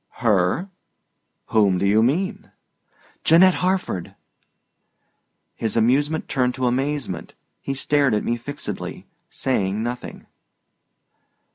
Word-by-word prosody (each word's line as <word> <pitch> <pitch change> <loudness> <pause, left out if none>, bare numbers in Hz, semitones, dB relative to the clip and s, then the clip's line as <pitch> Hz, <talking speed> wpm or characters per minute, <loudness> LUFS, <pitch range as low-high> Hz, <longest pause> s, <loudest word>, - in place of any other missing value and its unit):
"Her? 110 - +2 0.8
Whom 100 -4 +3
do 95 - 0
you 105 +2 +4
mean?" 165 - -1 0.7
"Janette 180 +3 +6
Harford." 180 - -1 1.4
His 110 0 -2
amusement 145 +7 +2
turned 125 -2 0
to 130 -1 -1
amazement; 130 - -2 0.3
he 135 - -3
stared 140 -3 +2
at 105 - -1
me 120 - 0
fixedly, 145 +6 -6 0.2
saying 105 -5 -1
nothing. 120 +1 -6
125 Hz, 100 wpm, -22 LUFS, 110-145 Hz, 1.4 s, Janette